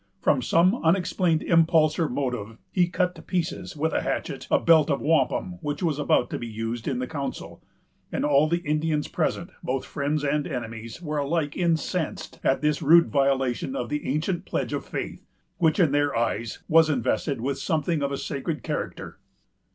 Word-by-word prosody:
From - - +2
some 185 +8 +3
unexplained 170 -1 +2
impulse 165 -1 +3
or 165 - +1
motive, 125 -5 -3
he 180 -2 +3
cut 180 +1 0
to 165 - -12
pieces, 180 0 -3
with 160 +2 0
a - - +1
hatchet, - - -3
a - - +5
belt 160 -2 +5
of 140 - +1
wampum 175 +3 +1
which 150 +3 -3
was 155 -4 0
about 145 -4 +2
to - - -3
be 120 - -5
used 115 +1 -4
in 135 - 0
the 125 - -2
council; 140 0 -6 0.5
and - - -1
all 145 +1 +4
the 170 +1 -1
Indians 150 0 0
present, 170 +2 -2
both 130 +1 -2
friends 145 +1 -2
and 145 +1 0
enemies, 115 -1 -6
were 150 -2 -2
alike 145 +1 -1
incensed 170 -1 -1
at 135 - +2
this 150 0 +1
rude 165 +3 +6
violation 135 - +1
of 275 - -3
the 150 0 -3
ancient 160 +5 -1
pledge - - -3
of - - -2
faith, - - -5 0.4
which, 160 -1 +3
in 165 -6 +4
their 145 -1 +1
eyes, 115 -1 -2
was 160 0 +5
invested 135 0 0
with 135 +3 -2
something 155 +1 0
of 140 0 -1
a 140 - -2
sacred 150 +3 -4
character. 150 -2 -5
150 Hz, 180 wpm, -25 LUFS, 140-165 Hz, 0.5 s, rude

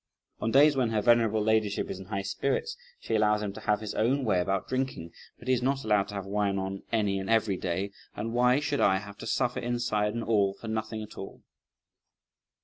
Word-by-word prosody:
On 115 - -1
days 145 +4 +6
when 125 -3 +1
her 110 -2 +1
venerable 115 -3 +4
ladyship 110 -2 +1
is 95 - -6
in 95 - -9
high 100 -1 -3
spirits, 140 - -1 0.2
she - - -4
allows 105 -1 +3
him 100 -1 -3
to - - -8
have 105 0 +1
his 105 -1 -4
own 130 +4 +1
way 100 -5 +2
about 95 +1 -1
drinking, 130 -10 -3 0.3
but 120 - -14
he's 130 -1 +2
not 135 +2 0
allowed 105 -2 +2
to 105 - -8
have 100 -1 -4
wine 100 0 0
on 95 0 -3
any 105 -4 +1
and 95 0 -5
every 110 -3 +3
day; 95 +2 -2 0.2
and 115 +1 -4
why 125 +2 +4
should 150 -1 -1
I 95 -1 +4
have 100 +1 -9
to - - -7
suffer 125 -2 0
inside 120 -3 -1
and 115 - -2
all 100 -3 +2
for 115 - -10
nothing 110 0 -3
at 105 - -11
all?" 95 - -9
110 Hz, 220 wpm, -28 LUFS, 100-120 Hz, 0.3 s, days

